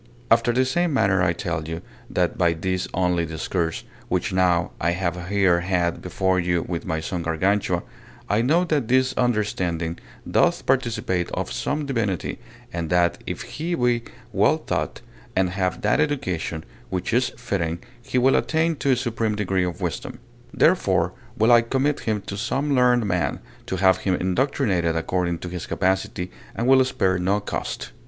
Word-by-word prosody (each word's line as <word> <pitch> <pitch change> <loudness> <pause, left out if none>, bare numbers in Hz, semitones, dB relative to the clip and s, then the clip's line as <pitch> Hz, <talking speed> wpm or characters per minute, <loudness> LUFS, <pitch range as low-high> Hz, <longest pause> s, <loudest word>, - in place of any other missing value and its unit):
After 120 - +5
the 130 +2 +2
same 170 +3 +1
manner 100 -6 +3
I 95 -2 +3
tell 80 -2 -3
you, 80 +1 -5 0.3
that - - 0
by 85 -1 +3
this 90 +2 -2
only 90 -2 +1
discourse, 80 +1 -2 0.2
which - - -1
now 90 -2 +2
I 85 +2 +2
have 90 -1 -2
here 95 -3 +3
had 85 -1 0
before 95 +1 0
you 85 -1 0
with 85 0 -4
my 80 -3 -1
son 85 +2 -3
Gargantua, 95 +5 +1 0.4
I 105 +2 +2
know 155 +9 +3
that 145 -8 0
his 130 +1 +3
understanding 95 -9 0 0.3
doth - - +2
participate 110 -8 0
of - - -2
some 150 +1 -2
divinity, 115 - -2 0.3
and 85 -2 -3
that, 90 0 +2
if - - -4
he 170 +3 -3
be 120 -3 +2 0.3
well - - +4
taught, - - -3 0.3
and 95 -1 +2
have 90 -1 -1
that 105 +5 +2
education 90 - -1 0.3
which 95 +3 -2
is 120 +1 +3
fitting, 85 -9 -2 0.2
he 125 - -2
will 130 +2 +4
attain 160 0 +1
to 135 -1 +2
a - - +3
supreme 115 -3 -1
degree 95 -3 0
of 90 -3 -5
wisdom. - - -3 0.3
Therefore - - +3 0.2
will 110 +2 +4
I 120 -1 +8
commit 135 +5 0
him 110 -2 -1
to 100 - -6
some 135 +6 0
learned 125 -3 +4
man, 90 -3 0 0.3
to - - -2
have 95 0 +4
him 95 0 0
indoctrinated 95 - +1
according 85 +1 0
to - - -4
his 90 -2 -5
capacity, 95 0 -1 0.2
and 115 - -1
will 130 0 +7
spare 95 -7 +1
no 95 +3 +1
cost. 65 -10 -4
95 Hz, 170 wpm, -23 LUFS, 90-125 Hz, 0.4 s, I